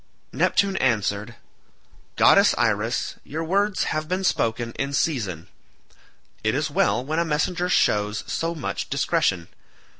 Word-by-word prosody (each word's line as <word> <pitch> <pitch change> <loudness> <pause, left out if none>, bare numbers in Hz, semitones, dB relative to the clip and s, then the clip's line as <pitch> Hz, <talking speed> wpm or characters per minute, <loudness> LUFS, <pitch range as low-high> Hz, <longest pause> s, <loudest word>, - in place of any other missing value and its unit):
Neptune 195 -1 +1
answered, 105 -2 0 0.8
"Goddess - - +5
Iris, - - 0
your 160 +3 -5
words 200 +4 +1
have 155 0 -2
been 185 +3 -2
spoken 115 -8 0
in 140 +3 -4
season. 105 - -1 1.0
It 110 +2 +1
is 150 +1 -1
well 120 -2 +1
when 155 +3 -1
a - - +3
messenger 170 +3 -1
shows 105 -9 +1
so 165 +1 -2
much 155 - -4
discretion. 85 -2 0
140 Hz, 125 wpm, -23 LUFS, 110-170 Hz, 1.0 s, Goddess